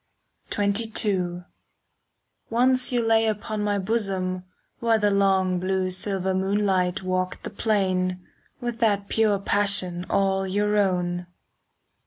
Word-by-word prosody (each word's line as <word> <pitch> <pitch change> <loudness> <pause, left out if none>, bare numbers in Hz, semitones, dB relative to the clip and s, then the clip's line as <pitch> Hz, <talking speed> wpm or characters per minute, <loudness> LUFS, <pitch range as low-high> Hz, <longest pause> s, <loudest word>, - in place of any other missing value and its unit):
XXII 200 -4 0 1.1
Once 255 +3 +2
you 240 -2 +1
lay 225 0 +3
upon 215 0 -2
my 205 -1 0
bosom, 190 -3 -2 0.3
While 230 -1 +2
the 210 -1 +2
long 190 -2 +2
blue 185 0 -1
silver 190 0 0
moonlight 190 -1 0
Walked 185 0 -2
the - - -6
plain, 185 -4 0 0.3
with 240 -2 -4
that 205 -3 +1
pure 215 -2 +2
passion 195 -3 +1
All 195 -1 +1
your 205 +2 0
own. 180 -3 0
195 Hz, 115 wpm, -24 LUFS, 185-210 Hz, 1.1 s, lay